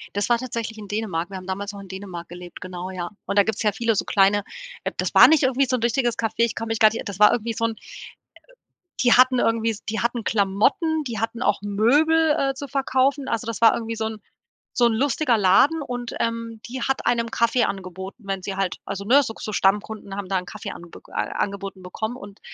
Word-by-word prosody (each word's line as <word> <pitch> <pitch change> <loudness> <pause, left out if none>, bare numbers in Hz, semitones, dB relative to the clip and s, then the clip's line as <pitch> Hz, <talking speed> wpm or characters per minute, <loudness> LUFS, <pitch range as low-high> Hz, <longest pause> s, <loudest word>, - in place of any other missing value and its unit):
Das 205 - -1
war 240 - +4
tatsächlich 230 -3 -5
in 205 -2 -9
Dänemark. 195 -5 -3
Wir 195 - -6
haben 185 - -10
damals 200 +2 -4
noch 200 - -9
in 195 - -11
Dänemark 185 -3 -8
gelebt, 175 0 -10
genau, 185 0 -6
ja. 175 -2 -5 0.2
Und 200 - -3
da 200 - +7
gibt's 220 +1 -2
ja 210 - +3
viele 225 +2 0
so - - -1
kleine 200 0 +3 0.4
äh, - - -2
das - - -2
war - - +9
nicht 310 -2 +4
irgendwie 265 +1 +3
so 255 - +1
'n - - -7
richtiges 240 0 +1
Café. 225 -2 -1
Ich 230 -1 +2
komm 225 - -4
mich 225 -1 -1
gar 215 - +7
nicht 225 - -5
eri - - -6
das 200 -2 -6
war 210 - +7
irgendwie 230 0 -1
so 230 - -1
'n 225 - -1 1.3
die 245 -2 +4
hatten 255 0 +6
irgendwie 230 -1 +1
s 215 - -7
die 220 +1 -3
hatten 235 -1 -1
Klamotten, 270 - +1
die 235 -6 -4
hatten 230 +2 -3
auch 210 - +1
Möbel, 295 +10 +3
äh, 270 0 +1
zu 280 +2 -6
verkaufen. 275 0 +1
Also, 230 0 -2
das 230 -3 -4
war 230 - +6
irgendwie 230 -1 -4
so 220 0 -2
'n 220 -1 -6 0.5
so 245 - +3
'n 235 - +3
lustiger 260 0 +1
Laden 210 - +4
und, 245 -3 -5
ähm, 230 -1 -3
die 255 0 -5
hat 270 - -1
einem 230 -1 +1
Kaffee 235 +1 +2
angeboten, 190 +2 -5
wenn 195 -1 -3
sie 195 - -4
halt 195 -2 -1
also 200 0 -5
ne, 275 +6 +5
so 225 - -5
k - - -14
so 215 - -4
Stammkunden 200 +1 0
haben 200 -2 -5
da 195 - -1
'nen 180 - -4
Kaffee 210 +2 -7
anbeg 170 -1 -12
a - - -14 0.2
angeboten 195 -1 -4
bekommen 220 +6 -5
und 200 -4 -12
220 Hz, 240 wpm, -23 LUFS, 200-240 Hz, 1.3 s, war